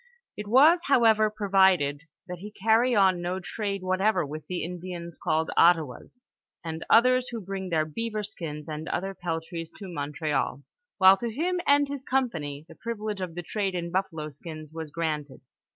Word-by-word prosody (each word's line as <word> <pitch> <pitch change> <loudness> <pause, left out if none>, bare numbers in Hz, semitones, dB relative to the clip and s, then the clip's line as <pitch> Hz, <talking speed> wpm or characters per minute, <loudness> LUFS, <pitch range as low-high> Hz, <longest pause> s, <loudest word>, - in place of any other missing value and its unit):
It 210 0 -6
was, 300 +10 +6
however, 225 -5 +4
provided, 190 -8 +2
" - - -51
that 180 -1 -6
he 205 +3 -8
carry 225 +4 +2
on 190 -3 +4
no 180 +2 -2
trade 200 0 -4
what 185 0 0
ever 200 -5 +2
with 155 +2 -8
tlie 180 -1 -3
Indians 175 -1 -7
called 160 +1 0
Ottawas, 165 - +2 0.4
and 160 0 -4
others 255 +2 +5
who 235 - -5
bring 190 -1 -5
their 160 -2 +1
beaver 215 +6 -4
skins 160 -8 -6
Bnd 155 0 -5
other 195 +2 -2
peltries 165 -2 -4
to 200 - -8
Montreal," 145 -3 -2 0.3
while 190 -1 +7
to 235 +4 -3
him 350 +8 -1
and 285 0 +5
his 280 -1 -6
company, 160 - -2
the 165 - -12
privilege 215 0 -5
of 175 -3 -5
the 175 - -5
trade 195 +1 -2
in 170 -1 -3
buffalo 165 -5 -2
skins 155 +1 -10
was 160 -1 -6
granted. 150 -3 -3
185 Hz, 175 wpm, -27 LUFS, 160-215 Hz, 0.4 s, while